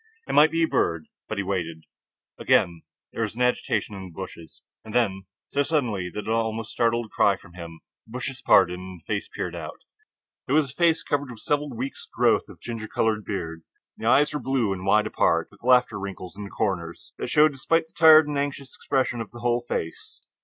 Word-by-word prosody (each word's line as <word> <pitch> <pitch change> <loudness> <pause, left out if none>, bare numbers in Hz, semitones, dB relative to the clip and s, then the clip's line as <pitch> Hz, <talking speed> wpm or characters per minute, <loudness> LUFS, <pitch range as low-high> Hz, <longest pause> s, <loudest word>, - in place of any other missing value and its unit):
It - - -3
might 150 +2 +7
be 165 +1 +1
a - - +3
bird. 85 - 0 0.2
But 110 - -3
he 100 - 0
waited. 85 -4 -3 0.6
Again 85 -2 +2 0.3
there - - -4
was 110 -1 -2
an 125 - 0
agitation 125 -3 0
of 100 - -7
the 95 - -8
bushes, 85 -2 -10 0.2
and 110 0 -9
then, 95 -5 +1 0.2
so 140 - 0
suddenly 120 - 0
that 105 - -5
it - - -10
almost 110 0 -1
startled 115 0 +1
a - - -16
cry 100 -1 +3
from 85 - -17
him, 85 -2 -9 0.3
the 110 - -15
bushes 130 +1 -5
parted 90 -2 +4
and 90 -1 -9
a - - -40
face - - -3
peered - - -4
out. - - -7 0.7
It 130 - 0
was 145 -3 +3
a - - -17
face 165 +1 +2
covered 145 -1 -1
with 115 -3 -10
several 145 0 0
weeks' 130 +2 -6
growth - - +2
of - - -13
ginger 115 -2 -6
colored 110 -1 0
beard. 80 -5 -4 0.3
The 110 - -4
eyes 145 +5 +4
were 150 - -1
blue 125 -5 0
and 95 0 -6
wide 105 +2 +4
apart, - - +1
with - - -20
laughter 125 -3 +3
wrinkles 95 -2 -7
in 105 0 -7
the - - -8
comers 85 -7 -3
that - - -3
showed 150 0 +5
despite 160 +4 +1
the 160 - -31
tired 155 -1 +8
and 145 -1 -1
anxious 140 -2 -4
expression 130 -3 -1
of 110 - -6
the 120 - -12
whole 120 0 +1
face. 80 - -4
115 Hz, 215 wpm, -25 LUFS, 95-135 Hz, 0.7 s, tired